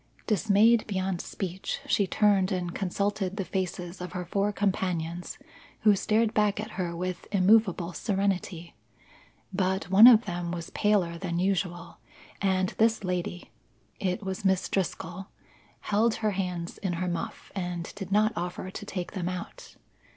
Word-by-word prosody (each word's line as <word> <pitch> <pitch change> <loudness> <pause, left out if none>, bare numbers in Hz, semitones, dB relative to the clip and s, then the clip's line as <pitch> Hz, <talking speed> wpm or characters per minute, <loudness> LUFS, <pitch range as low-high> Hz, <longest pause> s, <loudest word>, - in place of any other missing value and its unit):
Dismayed 215 +2 +4
beyond 190 -3 -1
speech, 190 -1 -4
she 200 - +2
turned 200 -1 +3
and 175 -2 -2
consulted 200 0 -1
the 195 - -2
faces 180 -1 -4
of 180 -1 -6
her 180 -1 -4
four 200 +4 0
companions 180 -4 -2 0.4
who 210 -2 +6
stared 220 +3 +1
back 210 -1 +2
at 215 +2 -5
her 175 -2 -3
with 180 +1 -4
immovable 190 -3 +3
serenity. 190 -4 -2 0.8
But 185 -2 -1
one 210 +5 +10
of 235 -2 +8
them 175 -2 -3
was 170 -1 -5
paler 185 -5 +1
than 170 -2 -2
usual, 180 -2 -1 0.4
and 190 -2 +2
this 225 -1 +3
lady 180 -1 -3 0.5
(it 190 +2 -1
was 190 0 -4
Miss 190 -1 +2
Driscoll) 185 0 -3 0.5
held 220 +2 +2
her 215 -1 0
hands 180 -3 -3
in 190 -3 -2
her 180 +2 -2
muff 175 -1 -5
and 175 -3 -4
did 195 -2 -7
not 215 +2 +3
offer 180 0 -4
to 205 - -7
take 180 -4 -4
them 180 -2 -3
out. 180 -1 -7
190 Hz, 150 wpm, -28 LUFS, 180-205 Hz, 0.8 s, one